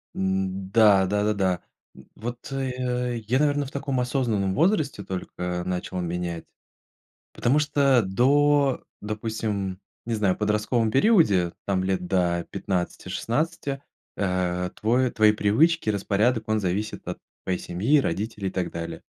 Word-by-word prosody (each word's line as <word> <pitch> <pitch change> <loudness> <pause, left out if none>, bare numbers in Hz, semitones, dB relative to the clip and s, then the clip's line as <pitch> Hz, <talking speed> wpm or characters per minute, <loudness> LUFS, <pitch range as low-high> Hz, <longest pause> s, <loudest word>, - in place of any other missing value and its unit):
М, 95 0 -1
да, 105 -4 +6
да-да-да. 100 -2 0 0.3
М, - - -14
вот, 120 +3 -7
э, 125 -2 -2
я, 130 +4 +2
наверное, 145 -1 +2
в 135 - -9
таком 140 -2 -2
осознанном 115 -7 0
возрасте 155 - +1
только 90 -1 -4
начал 90 0 -3
менять, 85 -1 -3 0.9
потому 130 +5 +2
что, 140 -4 +3
до, 140 +7 +3 0.2
допустим, 105 -3 -3 0.3
не 115 - -1
знаю, 100 -4 +2
в - - -17
подростковом 105 +2 +1
периоде, 130 - +4
там, 95 -2 0
лет 95 -2 -1
до 85 -2 +1
15-16, 120 - -2 0.3
э, 90 -2 -1
твой 125 +3 +1
твои 110 -1 +5
привычки, 110 +9 +2
распорядок- 110 +3 +1
он 110 - +2
зависит 100 +3 -3
от - - -4 0.3
твоей 90 -1 -1
семьи, 110 +13 +2
родителей 105 -1 -2
и - - -4
так 95 -1 -3
далее. 85 0 -6
105 Hz, 130 wpm, -25 LUFS, 95-125 Hz, 0.9 s, да